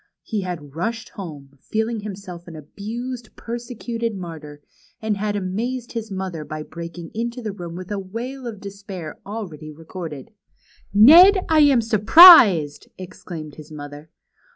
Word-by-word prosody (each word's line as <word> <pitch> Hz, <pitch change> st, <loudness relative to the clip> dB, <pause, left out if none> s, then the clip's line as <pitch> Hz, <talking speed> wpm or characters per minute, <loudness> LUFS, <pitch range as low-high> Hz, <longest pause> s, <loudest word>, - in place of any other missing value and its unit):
He 215 Hz, -3 st, -3 dB
had 165 Hz, -7 st, -7 dB
rushed 225 Hz, +7 st, -4 dB
home, 145 Hz, -8 st, -10 dB
feeling 220 Hz, +1 st, -2 dB
himself 190 Hz, -4 st, -9 dB
an 165 Hz, -, -10 dB
abused, 225 Hz, -, -7 dB
persecuted 235 Hz, -1 st, -5 dB
martyr, 155 Hz, -5 st, -9 dB, 0.4 s
and 220 Hz, -1 st, -1 dB
had 205 Hz, +1 st, -2 dB
amazed 230 Hz, +6 st, -4 dB
his 225 Hz, -2 st, -5 dB
mother 190 Hz, -5 st, -5 dB
by 155 Hz, 0 st, -7 dB
breaking 170 Hz, +1 st, -9 dB
into 235 Hz, +2 st, -4 dB
the 220 Hz, -3 st, -4 dB
room 175 Hz, -4 st, -8 dB
Avith 185 Hz, 0 st, -8 dB
the 205 Hz, -1 st, -3 dB
Avail 240 Hz, +7 st, -7 dB
of 220 Hz, -4 st, -7 dB
despair 195 Hz, -5 st, -9 dB
al 215 Hz, +1 st, -5 dB
ready 155 Hz, -2 st, -11 dB
recorded. 160 Hz, 0 st, -9 dB, 0.6 s
Ned, 345 Hz, -, +7 dB
I 320 Hz, -1 st, +4 dB
am 280 Hz, -5 st, +5 dB
surprised!" 215 Hz, -, +7 dB
exclaimed 165 Hz, -5 st, -9 dB
his 155 Hz, 0 st, -12 dB
mother. 145 Hz, +1 st, -10 dB
200 Hz, 145 wpm, -21 LUFS, 165-230 Hz, 0.6 s, Ned